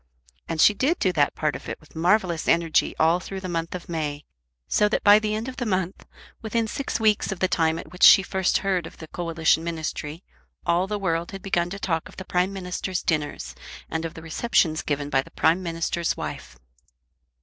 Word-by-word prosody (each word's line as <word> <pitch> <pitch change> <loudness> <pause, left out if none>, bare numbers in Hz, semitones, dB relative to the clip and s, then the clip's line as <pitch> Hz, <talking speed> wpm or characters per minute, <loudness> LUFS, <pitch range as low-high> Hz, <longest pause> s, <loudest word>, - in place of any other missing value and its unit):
And 165 - -3
she 210 - +7
did 275 - +1
do 185 - +1
that 145 -3 +2
part 155 -2 -1
of - - -8
it - - -5
with 155 - -21
marvellous 175 0 +1
energy 165 -2 +2
all 165 +2 +4
through 190 +2 -7
the 185 - -5
month 165 0 -3
of 180 - -7
May, 150 -3 -3 0.4
so 210 - +3
that - - -1
by 205 +1 +8
the 215 0 -1
end 220 +3 -3
of 260 - -7
the 245 - -2
month, 185 -2 -2 0.3
within 225 0 -1
six 275 +1 -3
weeks 215 -3 +2
of 195 - -3
the 185 - +1
time 160 -2 +1
at - - -9
which 180 - -12
she 195 - +9
first 190 0 +1
heard 185 -4 0
of - - -14
the 160 - -10
Coalition 165 -1 +1
Ministry, 160 0 -4 0.4
all 175 +2 +2
the 210 +1 -2
world 170 -2 -2
had 195 -1 -8
begun 175 -3 0
to 195 - -5
talk 165 -5 -2
of - - -16
the 190 - -7
Prime 180 +2 +1
Minister's 185 -1 -4
dinners, 150 - -2 0.4
and 160 0 -2
of 165 0 -5
the 160 - -9
receptions 160 -2 +1
given 145 -1 -3
by 135 - +3
the - - -14
Prime 170 +4 +2
Minister's 170 -1 -2
wife. 65 - -6
175 Hz, 215 wpm, -25 LUFS, 160-195 Hz, 0.4 s, she